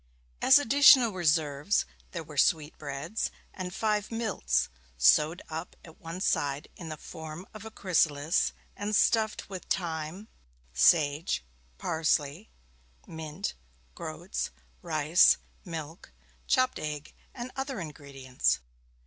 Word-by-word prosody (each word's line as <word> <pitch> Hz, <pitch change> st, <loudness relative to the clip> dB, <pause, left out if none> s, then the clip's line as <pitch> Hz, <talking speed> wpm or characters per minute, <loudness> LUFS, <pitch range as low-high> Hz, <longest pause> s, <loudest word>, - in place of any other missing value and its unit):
As 265 Hz, -, +8 dB
additional 275 Hz, -3 st, +7 dB
reserves 155 Hz, -1 st, +1 dB, 0.2 s
there 170 Hz, -2 st, -5 dB
were 150 Hz, -1 st, -12 dB
sweetbreads, 150 Hz, +4 st, 0 dB, 0.2 s
and 185 Hz, -1 st, -5 dB
five 210 Hz, +1 st, 0 dB
milts, 190 Hz, -, 0 dB, 0.3 s
sewed 150 Hz, -, +4 dB
up 160 Hz, +2 st, -6 dB
at 160 Hz, -, -15 dB
one 165 Hz, +2 st, -6 dB
side 140 Hz, -5 st, 0 dB
in 165 Hz, -3 st, -8 dB
the 155 Hz, -, -5 dB
form 160 Hz, +4 st, -8 dB
of 215 Hz, 0 st, -10 dB
a -, -, -6 dB
chrysalis, 165 Hz, -6 st, +1 dB, 0.2 s
and 210 Hz, +1 st, -2 dB
stuffed 220 Hz, 0 st, +2 dB
with 190 Hz, -2 st, -7 dB
thyme, 165 Hz, +3 st, -3 dB, 0.5 s
sage, 145 Hz, -, +3 dB, 0.3 s
parsley, 160 Hz, -, 0 dB, 0.6 s
mint, 160 Hz, +3 st, -5 dB, 0.4 s
groats, 80 Hz, +4 st, -4 dB, 0.3 s
rice, 155 Hz, +1 st, +4 dB, 0.3 s
milk, 160 Hz, -, -7 dB, 0.4 s
chopped 255 Hz, 0 st, +2 dB
egg, 150 Hz, -1 st, -5 dB, 0.2 s
and 250 Hz, 0 st, -6 dB
other 270 Hz, -3 st, -3 dB
ingredients. 140 Hz, -5 st, -1 dB
160 Hz, 110 wpm, -29 LUFS, 150-205 Hz, 0.6 s, As